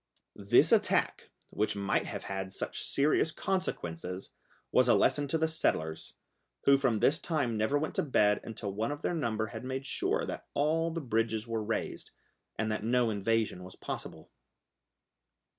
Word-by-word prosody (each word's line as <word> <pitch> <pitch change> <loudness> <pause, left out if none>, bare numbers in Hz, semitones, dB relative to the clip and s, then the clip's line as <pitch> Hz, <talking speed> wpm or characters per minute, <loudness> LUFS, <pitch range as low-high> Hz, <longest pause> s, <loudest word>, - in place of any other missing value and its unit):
This 100 -1 +4
attack, - - +2 0.2
which 105 0 0
might 100 -1 0
have - - -5
had 95 0 -4
such - - -3
serious 150 +3 +2
consequences, 90 - -3 0.4
was - - +4
a - - +6
lesson 145 -1 +2
to 160 - +1
the 160 0 +2
settlers, 80 - -1 0.5
who 140 0 +5
from 120 -6 +1
this 155 +4 +4
time 140 -9 -1
never 110 +7 +1
went 155 +2 -2
to - - +4
bed 105 -8 +3
until 105 -3 -5
one 110 +6 -1
of 145 - -6
their - - 0
number 115 -9 -1
had 110 +1 -6
made 130 +1 -4
sure - - 0
that - - -6
all 160 +3 +2
the 165 0 -4
bridges 115 -3 -1
were 115 -1 -2
raised, 110 +1 -3 0.5
and 110 0 -1
that 105 - -2
no 120 0 +2
invasion 105 -2 0
was 90 0 -11
possible. - - -7
115 Hz, 165 wpm, -31 LUFS, 105-145 Hz, 0.5 s, a